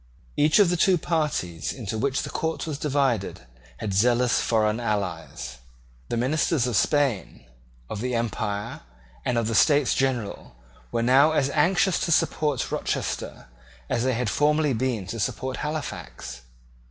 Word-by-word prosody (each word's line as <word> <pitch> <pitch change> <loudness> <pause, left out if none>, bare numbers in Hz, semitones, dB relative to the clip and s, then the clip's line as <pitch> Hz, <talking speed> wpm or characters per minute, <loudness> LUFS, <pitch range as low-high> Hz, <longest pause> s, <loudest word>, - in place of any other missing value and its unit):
Each 150 +2 +4
of 200 -5 +5
the 175 - +1
two 185 +1 +4
parties 150 - -1
into 110 -5 -5
which 135 +4 0
the - - -6
court 160 0 -2
was 150 -3 -4
divided 135 -9 0 0.4
had 105 -3 -3
zealous 120 +4 +3
foreign 110 -1 +1
allies. 85 - -3 0.5
The 120 - -1
ministers 140 +2 +1
of 125 -3 -1
Spain, 140 -5 +1 0.4
of 105 - -5
the 125 0 -1
Empire, 105 -3 -3 0.4
and 120 - 0
of 115 - +1
the 115 - -1
States 145 +5 +4
General 120 - -2 0.4
were 115 -1 0
now 135 +6 +5
as 140 -2 +1
anxious 175 +4 +2
to 170 - -1
support 150 -3 +1
Rochester - - -3 0.5
as 115 - +1
they 130 0 +1
had 120 0 -1
formerly 150 +4 +2
been 120 -4 -1
to 115 +5 -6
support 130 +5 -2
Halifax. 150 - -5
125 Hz, 150 wpm, -25 LUFS, 110-150 Hz, 0.5 s, of